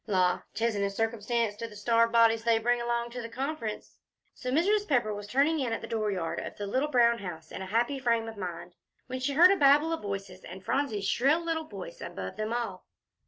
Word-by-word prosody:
La! 185 -3 +2
'tisn't 225 -2 0
a 200 - +1
circumstance 225 +1 -1
to 230 +2 -5
the 210 - -13
starved 230 +2 +2
bodies 230 -1 +4
they 230 -1 +3
bring 240 +2 +1
along 235 0 -1
to 240 -1 -6
Conference." 255 -3 -5 0.3
So 250 - -6
Mrs. 405 +8 +2
Pepper 240 -7 +1
was 205 0 -7
turning 285 +8 +2
in 250 -4 -1
at - - -3
the - - -7
dooryard 205 -7 -2
of - - -7
the 205 - -4
little 260 +9 0
brown 235 -3 +4
house 165 -5 -8
in - - -6
a 190 - -5
happy 240 +7 0
frame 230 -3 +1
of 225 - -7
mind, 175 -3 -6 0.3
when 255 0 -5
she 270 +2 -1
heard 350 +6 +7
a - - +4
babel 295 +3 +5
of 330 - -3
voices, 195 -2 -6
and 190 +2 -10
Phronsie's 225 -8 -1
little 305 +6 +4
shrill 325 -1 -1
voice 190 -4 -9
above 95 -1 -6
them 215 +1 -3
all. 230 -6 -3
230 Hz, 215 wpm, -29 LUFS, 205-260 Hz, 0.3 s, heard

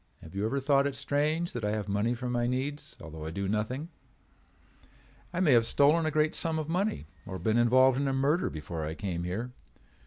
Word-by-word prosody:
Have 80 - -12
you 100 +2 -1
ever 140 +4 -1
thought 140 0 +3
it 140 - -4
strange 155 +5 0
that 120 - -4
I 105 0 0
have 105 -1 -3
money 105 +4 0
for 125 +1 -5
my 120 -1 0
needs 135 +4 -3
although 80 -1 -9
I 80 - -4
do 100 +4 -3
nothing? 110 - -2 1.4
I 175 - -3
may 175 -6 +4
have 115 -2 +5
stolen 155 +3 +4
a - - +2
great 155 0 +1
sum 160 -1 0
of 155 -1 -3
money 185 - -1 0.2
or 95 -1 -5
been 110 +6 +1
involved 130 +2 +5
in 140 - 0
a - - +1
murder 140 +6 +1
before 80 +1 -5
I 80 +1 -4
came 85 -4 -3
here. 110 +8 -3
125 Hz, 215 wpm, -29 LUFS, 100-145 Hz, 1.4 s, have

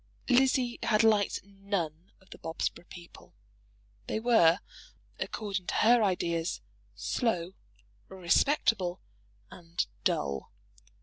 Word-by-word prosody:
Lizzie 255 -1 +3
had 215 -1 +3
liked 215 -3 +2
none 195 -4 -4
of 190 - -25
the - - -11
Bobsborough 165 +1 -4
people. 95 - -13 0.7
They - - -1
were, 220 -7 +5 0.6
according 195 -4 -4
to - - -2
her 235 +2 +5
ideas, 170 -4 0 0.4
slow, 175 - -1 0.6
respectable, 190 - +1 0.5
and 170 - -3 0.2
dull. 70 -6 -1
190 Hz, 100 wpm, -30 LUFS, 170-220 Hz, 0.7 s, were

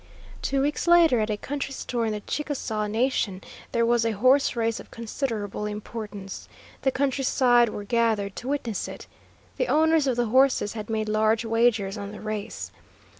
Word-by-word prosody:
Two 275 -1 0
weeks 295 +4 -1
later, 335 -7 +6
at 215 0 0
a 210 - -1
country 280 +3 -4
store 235 -2 -2
in - - -1
the 210 -1 -4
Chickasaw 235 -7 -3
Nation, 220 -3 0 0.3
there 235 0 +2
was 235 0 +3
a 230 -1 +1
horse 255 +7 +3
race 230 -1 0
of - - -12
considerable 220 -3 -3
importance. 210 -2 -7 0.3
The 265 - +2
country 270 0 0
side 245 -2 +4
were 210 - -6
gathered 215 -3 0
to 245 - -6
witness 255 -7 -2
it. - - -9 0.5
The - - 0
owners 320 -1 +3
of 255 - +1
the 240 0 +1
horses 255 -2 +3
had 215 -1 -6
made 220 -1 -1
large 215 +1 +2
wagers 225 -3 +1
on 200 0 -6
the 210 - -8
race. 215 -1 -5
230 Hz, 175 wpm, -26 LUFS, 215-265 Hz, 0.5 s, later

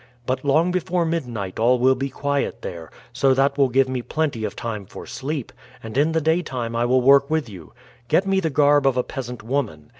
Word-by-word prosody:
But 130 +1 -2
long 155 +5 +2
before 180 -1 0
midnight 120 - -3
all 120 +3 +4
will 130 +2 +4
be 135 +1 -3
quiet 140 +1 -2
there; 85 -3 -7 0.2
so 130 +1 +3
that 135 +1 +2
will 140 -2 +3
give 130 +2 +3
me 130 -1 -3
plenty 145 -4 -2
of - - -3
time 105 -4 -5
for - - -10
sleep, 140 -1 -5 0.3
and 110 0 -8
in 150 +4 +3
the 160 - +1
daytime 145 -8 -1
I 120 +1 +1
will 130 +1 +3
work 140 +2 +5
with 155 -4 0
you. 95 -4 -12 0.3
Get 185 +10 +2
me 195 0 +2
the 165 -4 -1
garb 145 -1 +3
of 130 -2 +2
a 125 - +2
peasant 125 -4 -7
woman. 110 - -3
135 Hz, 215 wpm, -22 LUFS, 120-150 Hz, 0.3 s, work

